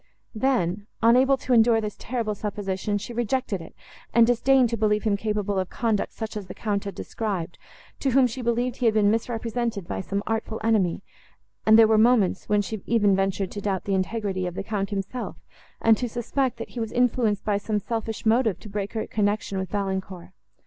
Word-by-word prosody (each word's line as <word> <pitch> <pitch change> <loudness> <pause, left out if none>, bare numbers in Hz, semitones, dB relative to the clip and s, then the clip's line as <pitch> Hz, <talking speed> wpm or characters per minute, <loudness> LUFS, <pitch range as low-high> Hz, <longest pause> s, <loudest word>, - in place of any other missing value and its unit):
Then, 215 -6 0 0.2
unable 255 +4 +5
to 255 0 -1
endure 230 -1 +5
this 210 -2 -4
terrible 230 -3 -3
supposition, 205 -1 -3
she 215 +4 -7
rejected 240 -4 -1
it, 165 - -12 0.4
and 235 -1 +7
disdained 245 +1 +3
to - - +1
believe 210 -1 +1
him 215 -3 +2
capable 205 -1 -1
of 185 - -2
conduct, 225 -5 -1
such 220 -1 -6
as 205 -3 -5
the - - -8
Count 205 -2 -2
had 200 - -5
described, 195 -6 -4 0.4
to 275 - 0
whom 265 +1 +5
she 250 +1 -3
believed 240 +1 0
he 250 - -2
had 220 - +2
been 205 -1 +4
misrepresented 230 -3 -2
by - - -3
some 200 +2 -3
artful 225 0 -2
enemy; 200 -5 +1 0.6
and 220 0 +8
there 225 -1 +8
were 220 0 +4
moments, 225 -4 +3
when 210 -1 +3
she 215 +1 -5
even 210 -4 +3
ventured 195 0 -1
to 205 - -5
doubt 195 -2 -1
the 200 - -2
integrity 190 -1 -1
of 175 - -6
the - - -3
Count 200 -2 -2
himself, 200 +4 -4 0.4
and 225 -1 +4
to 245 +1 -2
suspect, 245 +3 -1
that 230 - -6
he 245 - -7
was 225 -1 -3
influenced 235 -4 +1
by 205 -2 +1
some 210 +1 -1
selfish 225 +1 -4
motive, 225 -3 +2
to - - -11
break 200 -1 -4
her 220 - -2
connection 205 -2 -1
with 190 -2 -4
Valancourt. 190 -3 -3
215 Hz, 200 wpm, -25 LUFS, 200-235 Hz, 0.6 s, and